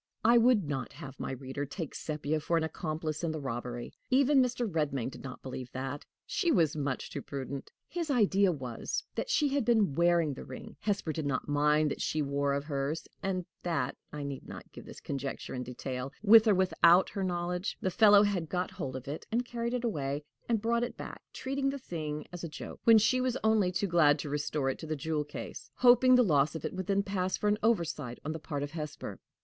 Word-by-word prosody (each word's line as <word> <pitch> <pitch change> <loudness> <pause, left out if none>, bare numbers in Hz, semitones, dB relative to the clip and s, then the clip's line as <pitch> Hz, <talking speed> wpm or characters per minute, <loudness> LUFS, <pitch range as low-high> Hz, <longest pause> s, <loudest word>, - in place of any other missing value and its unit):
I 235 +1 +7
would 230 -3 +5
not 135 -4 -3
have 140 -5 -10
my - - -3
reader 135 +2 -5
take 145 +2 -5
Sepia 155 0 -2
for 170 +2 0
an 165 - +1
accomplice 155 0 -3
in 165 - 0
the 155 - -4
robbery. 120 -2 -5 0.2
Even 275 +1 +5
Mr. 245 -1 0
Redmain 145 - -1
did - - -11
not 130 -2 -8
believe 130 -1 -6
that: 135 +2 -4 0.2
she 360 -5 +1
was 160 - +3
much 140 -3 -2
too - - -4
prudent! 140 0 -6 0.2
His 340 -2 -3
idea 200 -7 +4
was, 130 -7 -4
that - - -3
she 300 -12 +3
had 280 -1 +1
been 220 - +3
wearing 170 -1 +3
the - - -8
ring 130 - -9
Hesper 200 -6 -1
did 150 -1 -2
not 135 -2 -1
mind 150 +1 +3
what - - -4
she 155 -1 0
wore 140 0 0
of 140 - -2
hers 145 +1 -2
and 185 -2 -1 0.2
that 140 -7 -1 0.2
(I 150 -1 -5
need 140 -1 -6
not - - -10
give - - -11
his - - -10
conjecture 135 -1 -4
in 125 - -3
detail), 125 +1 -5
with 220 +1 +8
or 210 - +5
without 180 -1 +5
her 195 - -3
knowledge, 180 0 -2
the 185 - -1
fellow 205 +1 +7
had 185 -6 0
got 180 0 -1
hold 160 -9 -5
of 130 0 -7
it 145 +3 -5
and 240 +2 +1
carried 235 0 -2
it 250 - -2
away, 145 - -2 0.2
then 235 - +2
brought 235 +2 +1
it 245 - -4
back, - - -7
treating 275 +1 -1
the 275 - -3
thing 155 - -5
as 175 - -7
a 170 - -3
joke, 150 - -8
when 230 -1 +8
she 255 +4 +3
was 255 -1 0
only 215 -4 +3
too 185 - 0
glad 165 -5 +4
to 145 - -5
restore 145 -2 0
it - - -8
to 160 - -7
the 155 - -1
jewel 155 +1 -1
case, 150 - -8
hoping 250 +1 +6
the 250 - +6
loss 150 -5 +3
of 160 - -5
it - - -3
would 185 -1 -4
then 200 0 +2
pass 185 -2 -1
for 210 - -1
an 210 +1 +2
oversight 160 - 0
on 155 - -1
the 160 - -4
part 145 -1 -4
of 145 - -5
Hesper. 155 -3 -6
160 Hz, 225 wpm, -31 LUFS, 140-210 Hz, 0.2 s, with